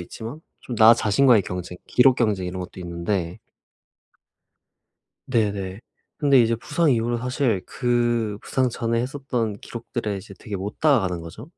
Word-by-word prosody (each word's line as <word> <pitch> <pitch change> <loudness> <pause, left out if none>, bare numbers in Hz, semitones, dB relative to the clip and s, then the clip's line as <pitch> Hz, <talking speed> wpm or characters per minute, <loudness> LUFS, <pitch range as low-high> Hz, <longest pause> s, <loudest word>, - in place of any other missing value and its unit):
있지만 115 - -8 0.2
좀 120 - -6
나 110 +2 +8
자신과의 115 0 +4
경쟁 90 0 -6
기록 125 +1 +5
경쟁 105 -6 0
이런 90 +1 -5
것도 90 +1 -8
있는데 85 0 -3 1.9
네네. 100 -5 -1 0.4
근데 140 -3 +5
이제 115 0 +3
부상 150 +6 +1
이후로 120 -1 +1
사실 125 -5 0
그 120 -3 0
부상 130 -1 0
전에 115 -1 -1
했었던 125 -5 -3
기록들에 115 -2 -5
이제 100 0 -10
되게 105 -3 -6
못 100 +3 -6
다가가는 95 - +2
거죠? 95 - -10
115 Hz, 300 characters per minute, -23 LUFS, 95-125 Hz, 1.9 s, 나